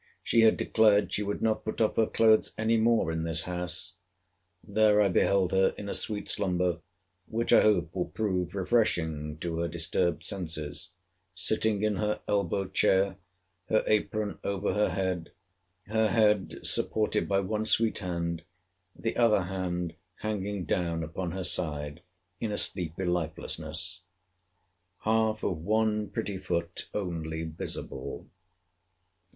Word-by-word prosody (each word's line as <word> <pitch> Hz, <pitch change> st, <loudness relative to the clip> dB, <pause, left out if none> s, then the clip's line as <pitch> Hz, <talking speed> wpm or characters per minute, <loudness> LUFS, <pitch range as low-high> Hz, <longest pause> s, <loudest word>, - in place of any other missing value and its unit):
She 115 Hz, -, +3 dB
had 110 Hz, -1 st, +5 dB
declared 105 Hz, -2 st, +3 dB
she -, -, +1 dB
would 100 Hz, 0 st, -3 dB
not 110 Hz, -1 st, +1 dB
put 110 Hz, -, -4 dB
off 110 Hz, -2 st, +2 dB
her 110 Hz, -, +3 dB
clothes 110 Hz, -1 st, +3 dB
any 110 Hz, +1 st, +2 dB
more 110 Hz, -6 st, +3 dB
in 80 Hz, 0 st, -2 dB
this 80 Hz, -1 st, -1 dB
house. 90 Hz, -1 st, -4 dB, 0.7 s
There 105 Hz, 0 st, +4 dB
I 100 Hz, -2 st, +4 dB
beheld 95 Hz, 0 st, +2 dB
her 95 Hz, 0 st, +3 dB
in 100 Hz, -, -6 dB
a -, -, -2 dB
sweet 105 Hz, -2 st, -2 dB
slumber, 90 Hz, -3 st, 0 dB, 0.5 s
which 115 Hz, +1 st, 0 dB
I -, -, +8 dB
hope 90 Hz, -6 st, +2 dB
will 90 Hz, -2 st, -1 dB
prove 90 Hz, -1 st, -2 dB
refreshing 80 Hz, -8 st, +1 dB
to 85 Hz, 0 st, -3 dB
her 85 Hz, -, 0 dB
disturbed 85 Hz, 0 st, 0 dB
senses; 85 Hz, -2 st, -4 dB, 0.5 s
sitting 105 Hz, +2 st, +1 dB
in 105 Hz, -2 st, +1 dB
her 105 Hz, +2 st, 0 dB
elbow 100 Hz, -1 st, 0 dB
chair, 95 Hz, 0 st, +2 dB, 0.5 s
her 110 Hz, -, +3 dB
apron 105 Hz, 0 st, 0 dB
over 100 Hz, -1 st, -1 dB
her 105 Hz, -1 st, +2 dB
head; 90 Hz, -2 st, -2 dB, 0.5 s
her 110 Hz, +1 st, +2 dB
head 105 Hz, -3 st, +2 dB
supported 110 Hz, -1 st, +1 dB
by 100 Hz, -1 st, +3 dB
one 105 Hz, +3 st, -2 dB
sweet 115 Hz, 0 st, +2 dB
hand, 85 Hz, -3 st, -3 dB, 0.5 s
the 115 Hz, -, -3 dB
other 110 Hz, -5 st, +4 dB
hand 90 Hz, -2 st, -3 dB, 0.3 s
hanging 100 Hz, -3 st, -3 dB
down 85 Hz, 0 st, -1 dB
upon 85 Hz, +2 st, -4 dB
her 95 Hz, +2 st, -4 dB
side, 75 Hz, -4 st, -2 dB, 0.4 s
in 110 Hz, -, -2 dB
a 105 Hz, -, -2 dB
sleepy 90 Hz, 0 st, +2 dB
lifelessness; 90 Hz, +1 st, -3 dB, 1.0 s
half 110 Hz, 0 st, +1 dB
of 90 Hz, -6 st, -1 dB
one 105 Hz, +3 st, +1 dB
pretty 100 Hz, -2 st, -3 dB
foot 85 Hz, -2 st, -3 dB
only 80 Hz, -5 st, -3 dB
visible. 80 Hz, -4 st, -4 dB
95 Hz, 140 wpm, -29 LUFS, 85-105 Hz, 1.0 s, I